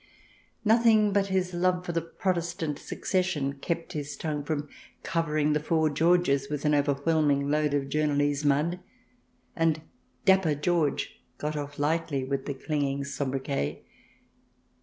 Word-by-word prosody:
Nothing 220 -2 +5
but 200 0 +2
his 185 -1 0
love 180 +1 +1
for 175 - -2
the 165 0 0
Protestant 170 -3 -2
succession 150 -7 -1
kept 170 +2 -3
his 145 -1 -5
tongue 150 -2 -3
from 150 0 -2 0.4
covering 155 -3 +1
the 150 - +2
four 155 0 +1
Georges 160 -3 +2
with 150 0 -3
an 150 - +3
overwhelming 145 0 +2
load 150 -1 +2
of 140 - +1
journalese 145 -1 +1
mud, 150 +5 +2 0.8
and 160 -2 +1 0.4
Dapper 190 -6 +4
George 150 -1 0 0.2
got 150 +1 -3
off 145 -1 -5
lightly 150 -2 0
with 135 0 -3
the 140 - -2
clinging 140 -1 -1
sobriquet. 135 - -3
150 Hz, 135 wpm, -28 LUFS, 145-170 Hz, 0.8 s, Nothing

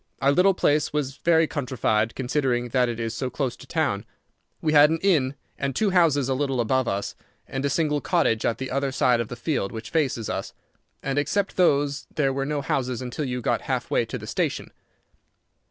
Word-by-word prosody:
Our 140 - +3
little 185 +5 +4
place 150 -3 +2
was 145 -2 -2
very 165 -1 +3
countrified, 120 -6 -1
considering 125 -2 0
that 125 0 +2
it 115 -1 -4
is 115 0 -2
so 130 +2 -3
close 130 -2 -2
to - - -14
town. 145 -11 0 0.6
We 155 -1 0
had 150 0 +7
an 165 - +1
inn 145 -9 +2 0.2
and 135 -1 -2
two 210 -3 +2
houses 160 -7 +3
a 135 - +1
little 135 -1 -1
above 130 +2 +1
us, 100 +1 -2 0.3
and 135 0 -4
a 140 - +1
single 150 0 +1
cottage 115 -2 +1
at 115 - 0
the 130 0 -5
other 135 0 0
side 125 -2 +2
of 115 - -2
the 125 - -6
field 120 -5 -2
which 110 0 -7
faces 135 -8 0
us, - - -4 0.5
and 135 +1 0
except 195 +7 -1
those 145 -5 +2
there 135 -3 +1
were 135 0 -2
no 150 -1 -1
houses 130 -3 -1
until 130 +4 -4
you 125 -1 -3
got - - 0
half - - -3
way - - +3
to - - -5
the - - -9
station. - - -2
135 Hz, 205 wpm, -25 LUFS, 125-150 Hz, 0.6 s, had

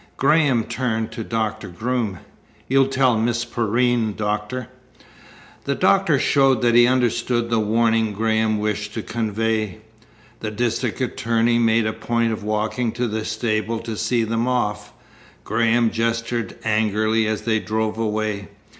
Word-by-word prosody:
Graham 140 -4 +3
turned 115 -2 -2
to 115 - -5
Doctor 110 -1 -2
Groom. 110 +2 -2 0.5
"You'll 135 0 +3
tell 130 -4 +2
Miss 120 +1 0
Perrine, 120 -1 +1
Doctor?" 105 +3 -3 1.0
The - - 0
doctor - - +3
showed 135 -4 +3
that 120 -1 +3
he 120 0 +6
understood 120 -1 0
the 115 - +3
warning 110 0 +2
Graham 110 +1 +1
wished 105 0 -3
to 110 - -3
convey. 110 -2 -1 0.6
The 110 - -3
district 115 +3 -2
attorney 115 -2 +1
made 115 -1 +3
a 110 - -1
point 115 -1 0
of 110 - -6
walking 110 +3 -1
to 125 0 -1
the 110 0 -3
stable 110 0 -1
to 115 -1 -5
see 120 +2 0
them 115 +2 -1
off. 105 -5 -1 0.5
Graham 115 +1 +2
gestured 115 0 -2
angrily 110 0 +1
as 110 0 -2
they 110 -1 +1
drove 110 +1 -2
away. 105 -2 -2
115 Hz, 140 wpm, -22 LUFS, 110-120 Hz, 1.0 s, he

